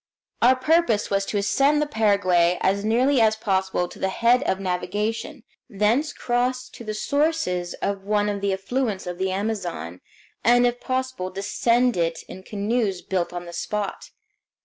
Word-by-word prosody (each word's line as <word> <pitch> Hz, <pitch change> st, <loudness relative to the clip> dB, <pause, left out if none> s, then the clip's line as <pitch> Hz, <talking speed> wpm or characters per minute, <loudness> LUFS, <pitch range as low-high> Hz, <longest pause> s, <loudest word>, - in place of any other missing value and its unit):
Our 250 Hz, +2 st, +6 dB
purpose 260 Hz, -6 st, +2 dB
was 195 Hz, 0 st, +1 dB
to 210 Hz, -, -1 dB
ascend 275 Hz, +9 st, +2 dB
the 300 Hz, -, +1 dB
Paraguay 190 Hz, -9 st, +2 dB
as 200 Hz, +2 st, +1 dB
nearly 245 Hz, +4 st, +3 dB
as 220 Hz, -1 st, +4 dB
possible 190 Hz, -4 st, 0 dB
to -, -, -13 dB
the 190 Hz, -, 0 dB
head 235 Hz, +5 st, +3 dB
of 190 Hz, -, 0 dB
navigation, 210 Hz, +8 st, -3 dB, 0.3 s
thence 230 Hz, +8 st, +1 dB
cross 250 Hz, 0 st, -1 dB
to -, -, -11 dB
the 215 Hz, -1 st, -4 dB
sources 285 Hz, -, 0 dB
of 200 Hz, -1 st, -2 dB
one 205 Hz, +1 st, +1 dB
of 205 Hz, -1 st, -2 dB
the 200 Hz, 0 st, 0 dB
affluents 200 Hz, +1 st, -2 dB
of 180 Hz, 0 st, -6 dB
the 190 Hz, 0 st, 0 dB
Amazon, 185 Hz, -, -3 dB, 0.4 s
and 245 Hz, +1 st, +5 dB
if 245 Hz, 0 st, 0 dB
possible 260 Hz, -7 st, -2 dB
descend 230 Hz, +5 st, +1 dB
it 165 Hz, -1 st, -1 dB
in 190 Hz, -, -9 dB
canoes 205 Hz, -1 st, -1 dB
built 185 Hz, -2 st, -1 dB
on 175 Hz, 0 st, -6 dB
the 170 Hz, -, -9 dB
spot. 205 Hz, +3 st, -4 dB
210 Hz, 165 wpm, -24 LUFS, 190-245 Hz, 0.4 s, Our